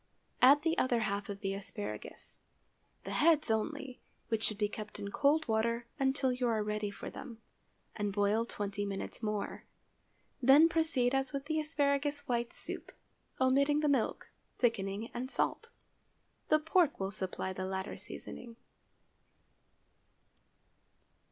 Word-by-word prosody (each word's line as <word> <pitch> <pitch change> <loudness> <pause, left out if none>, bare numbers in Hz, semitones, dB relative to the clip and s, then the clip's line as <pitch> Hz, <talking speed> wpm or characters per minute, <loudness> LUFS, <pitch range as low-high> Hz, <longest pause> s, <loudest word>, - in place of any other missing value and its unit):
Add 280 +4 +7
the 325 0 +1
other 240 -3 +2
half 200 -1 -2
of 200 0 -6
the 195 -2 -1
asparagus—(the 205 +1 -9
heads 310 -6 +3
only, 260 +3 -2 0.3
which 225 -2 0
should 215 -2 +2
be 210 -1 +1
kept 215 0 -7
in 200 -1 -5
cold 295 +5 +3
water 230 +1 +1
until 265 -1 +2
you 250 0 0
are 220 -2 +1
ready 210 0 -2
for 200 - -7
them), 235 -4 -9 0.6
and 205 -1 -1
boil 205 +2 +2
twenty 205 -2 -3
minutes 200 +2 -5
more. 210 -2 -3 0.8
Then 275 +6 +8
proceed 315 -7 +2
as 270 +1 +1
with 275 0 -3
the 315 +1 0
asparagus 290 -1 0
white 235 -1 0
soup, - - -4 0.5
omitting 280 +3 +3
the 300 - +2
milk, 270 -6 0 0.3
thickening, 220 -2 0
and 250 +2 -4
salt. 460 - -1 0.8
The 310 - +6
pork 320 0 +2
will 195 0 -2
supply 190 -1 -3
the 185 0 -4
latter 190 0 -3
seasoning. 235 -1 -8
240 Hz, 135 wpm, -33 LUFS, 210-280 Hz, 0.8 s, Then